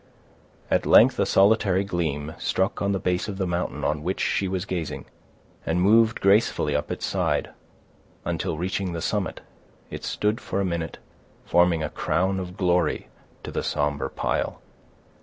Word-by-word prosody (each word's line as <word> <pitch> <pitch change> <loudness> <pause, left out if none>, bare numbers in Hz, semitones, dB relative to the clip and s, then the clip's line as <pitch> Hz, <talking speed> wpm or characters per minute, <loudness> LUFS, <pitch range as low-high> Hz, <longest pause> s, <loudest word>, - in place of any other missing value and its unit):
At - - +2
length - - +6
a - - +2
solitary 100 -1 +4
gleam 80 -5 -2
struck 95 +1 0
on 100 - +1
the 100 - +1
base 90 +1 -1
of 100 -2 -5
the 95 - -1
mountain 90 0 -2
on 75 0 0
which 95 +5 -2
she 95 - 0
was 95 0 -2
gazing, 90 -5 -4 0.6
and 80 +2 0
moved 110 +4 +4
gracefully 100 -7 +3
up 75 0 -1
its - - -3
side, - - 0 0.7
until 85 -1 -2
reaching 95 +1 -2
the 85 - -4
summit, 105 -4 -2 0.5
it - - -7
stood 105 +2 -1
for 95 - -3
a 100 - +1
minute, 85 -3 -3 0.5
forming 85 -2 +3
a 75 - -2
crown 95 +7 0
of 90 0 -7
glory 90 -2 +1 0.3
to - - -6
the - - -2
somber 75 -1 -1
pile. - - -2
90 Hz, 160 wpm, -25 LUFS, 80-95 Hz, 0.7 s, length